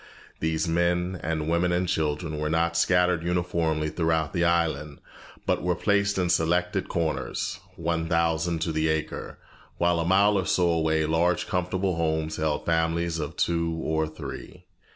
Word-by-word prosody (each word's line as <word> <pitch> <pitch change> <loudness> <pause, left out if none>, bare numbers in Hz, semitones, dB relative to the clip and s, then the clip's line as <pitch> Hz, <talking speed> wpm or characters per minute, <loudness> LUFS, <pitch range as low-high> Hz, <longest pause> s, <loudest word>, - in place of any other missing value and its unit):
These 80 0 0
men 90 +2 0
and 80 -1 -2
women 85 +2 +2
and 90 +1 +1
children 80 -2 -1
were 75 0 -1
not 85 +1 +1
scattered 90 0 +3
uniformly 85 -3 0
throughout 80 -2 0
the 85 - +1
island, 80 -4 0 0.5
but - - +1
were 90 +1 0
placed 100 0 +1
in 90 -2 +1
selected 90 +2 +1
corners, 80 -7 -2 0.2
one 85 0 -2
thousand 85 0 +1
to 80 - -1
the 80 0 0
acre, 80 0 -3 0.4
while 85 0 +2
a - - +1
mile 100 +3 +4
or 95 - -2
so 90 -2 +2
away 80 -1 +1
large 85 +3 +1
comfortable 90 0 -1
homes 80 -1 -1
held 80 -1 -1
families 80 0 0
of 75 -2 -5
two 85 -1 0
or 80 -1 0
three. 80 0 -9
85 Hz, 155 wpm, -26 LUFS, 80-90 Hz, 0.5 s, mile